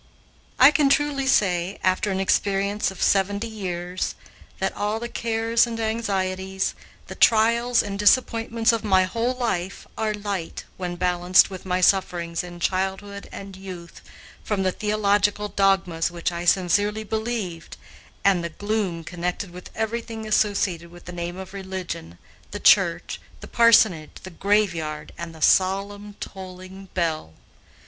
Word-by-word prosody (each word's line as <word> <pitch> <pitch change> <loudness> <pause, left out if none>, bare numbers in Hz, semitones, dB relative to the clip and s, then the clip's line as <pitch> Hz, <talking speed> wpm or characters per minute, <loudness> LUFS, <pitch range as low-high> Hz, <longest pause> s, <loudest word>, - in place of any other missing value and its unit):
I 260 +3 +8
can 285 -1 +3
truly 280 -1 +1
say, 185 -6 +2
after 185 +3 +1
an 190 -1 -1
experience 200 +1 +1
of 190 -2 -5
seventy 200 +3 +2
years, 180 -4 -4 0.4
that - - -2
all 210 +2 -1
the 235 - -4
cares 230 0 +1
and 230 -1 -5
anxieties, 190 -4 -1 0.3
the - - -8
trials 235 +2 +4
and 200 -1 -5
disappointments 225 +1 +3
of 230 -2 -2
my 190 -3 +4
whole 230 +6 -1
life, 195 -7 -3
are 215 -1 0
light, 200 -5 -4
when 180 -1 -4
balanced 180 +1 +3
with 190 0 -8
my 180 0 0
sufferings 175 -3 +1
in 175 -1 -9
childhood 195 +3 -2
and 195 -1 -9
youth 185 -3 -10 0.4
from 205 -3 -1
the 185 - +2
theological 210 0 +1
dogmas 190 -5 +1
which 170 +1 -2
I 170 0 -5
sincerely 205 +4 +2
believed, 215 -6 -4 0.5
and 190 -3 +4
the 170 - -3
gloom 200 -2 -2
connected 180 +2 -4
with 180 +1 -10
everything 225 0 -3
associated 200 -5 +1
with 175 0 -15
the 180 - -7
name 175 0 -5
of 190 0 -9
religion, 185 - -6 0.3
the - - -6
church, - - +3 0.2
the - - -10
parsonage, 220 -9 +4
the 185 - -8
graveyard, 170 -6 0
and 170 -1 -7
the 160 - -5
solemn, 200 +2 +2
tolling 190 0 -9
bell. 160 - -1
195 Hz, 140 wpm, -24 LUFS, 180-215 Hz, 0.5 s, I